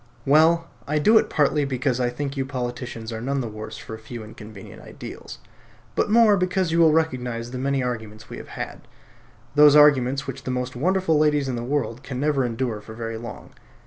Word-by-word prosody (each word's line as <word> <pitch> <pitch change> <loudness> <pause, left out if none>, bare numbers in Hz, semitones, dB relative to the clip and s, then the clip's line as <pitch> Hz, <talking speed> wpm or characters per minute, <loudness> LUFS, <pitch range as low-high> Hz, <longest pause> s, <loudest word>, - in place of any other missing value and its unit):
Well, 160 +4 +4 0.2
I 150 +2 0
do 215 +9 +6
it - - -2
partly 150 0 +2
because 130 -2 -1
I 125 -1 +1
think 140 +3 -4
you 135 - -1
politicians 125 -3 -5
are 110 - -5
none 135 +3 -1
the 125 - -3
worse 110 0 -8
for - - -9
a 110 - -7
few 110 +1 -8
inconvenient 105 -2 -11
ideals; - - -10 0.6
but - - 0
more 220 -1 +6
because 185 -1 0
you 165 - +2
will 165 -2 +6
recognise 125 -7 -1
the 125 - -5
many 135 0 0
arguments 110 -3 -5
we - - -8
have - - -10
had, - - -7 0.7
those 150 0 +7
arguments 140 -3 +5
which 135 - -6
the - - -6
most 125 0 -3
wonderful 175 +2 +1
ladies 150 -2 +2
in 130 - -2
the 120 - -4
world 125 -3 -2
can 130 -2 -6
never 145 -1 +1
endure 115 -2 -2
for 110 +1 -11
very 115 -1 -5
long. 120 0 -9
130 Hz, 205 wpm, -23 LUFS, 120-150 Hz, 0.7 s, those